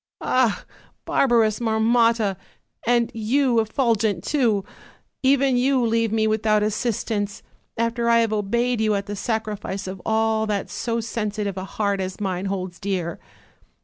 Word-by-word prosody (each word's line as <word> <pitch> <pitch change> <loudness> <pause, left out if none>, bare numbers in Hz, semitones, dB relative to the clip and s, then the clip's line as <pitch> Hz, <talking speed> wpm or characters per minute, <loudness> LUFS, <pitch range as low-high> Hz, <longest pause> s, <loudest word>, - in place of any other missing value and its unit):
Ah! 250 -5 +1 0.4
barbarous 230 -5 +2
Marmotta! 225 -2 +2 0.5
and 235 -1 +2
you, 240 +2 +2
Effulgent 220 -5 +1
too! 230 -9 +1 0.6
even 270 -1 +3
you 255 0 +2
leave 230 -1 +1
me 220 0 +2
without 215 -1 +2
as 215 0 0
sistance, 210 -3 -2 0.3
after 230 +1 0
I 230 0 +5
have 225 -1 0
obeyed 235 +3 0
you 215 -1 +2
at 200 0 -2
the 205 - -5
sacrifice 210 -3 -3
of 190 -1 -6
all 220 0 +1
that 205 -2 -2
so 230 -1 -2
sensitive 210 -3 -3
a 190 0 -5
heart 200 -1 -1
as 185 +1 -5
mine 190 -2 -2
holds 185 -2 -4
dear." 185 -4 -3
220 Hz, 145 wpm, -23 LUFS, 200-235 Hz, 0.6 s, I